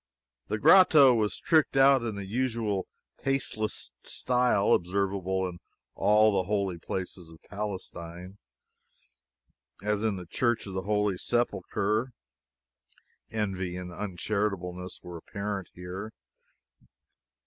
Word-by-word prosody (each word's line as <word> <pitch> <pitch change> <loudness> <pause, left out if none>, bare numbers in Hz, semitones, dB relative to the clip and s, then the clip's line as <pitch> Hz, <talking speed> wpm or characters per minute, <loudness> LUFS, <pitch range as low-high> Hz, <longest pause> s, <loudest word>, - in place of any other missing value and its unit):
The 105 - -1
grotto 150 - +7
was 110 -3 0
tricked 155 -4 +2
out 135 -1 +6
in 115 -3 -3
the 100 -1 -5
usual 110 -3 -1 0.3
tasteless 130 -5 -2
style 125 -5 +2
observable 95 0 0
in 85 -1 -8 0.3
all 110 +1 +4
the 95 -2 0
holy 100 -4 -1
places 90 -1 -5
of 80 -1 -14
Palestine. 95 -2 -6 1.4
As 105 0 0
in 110 -3 +1
the 90 -1 -7
Church 120 +6 0
of 95 - -7
the 95 - -2
Holy 105 -3 +1
Sepulchre, 120 0 0 1.2
envy 95 -4 -2
and 90 -1 -7
uncharitableness 90 -2 -3
were 90 -1 -7
apparent 100 +2 -5
here. 90 +4 -7
100 Hz, 110 wpm, -28 LUFS, 90-110 Hz, 1.4 s, grotto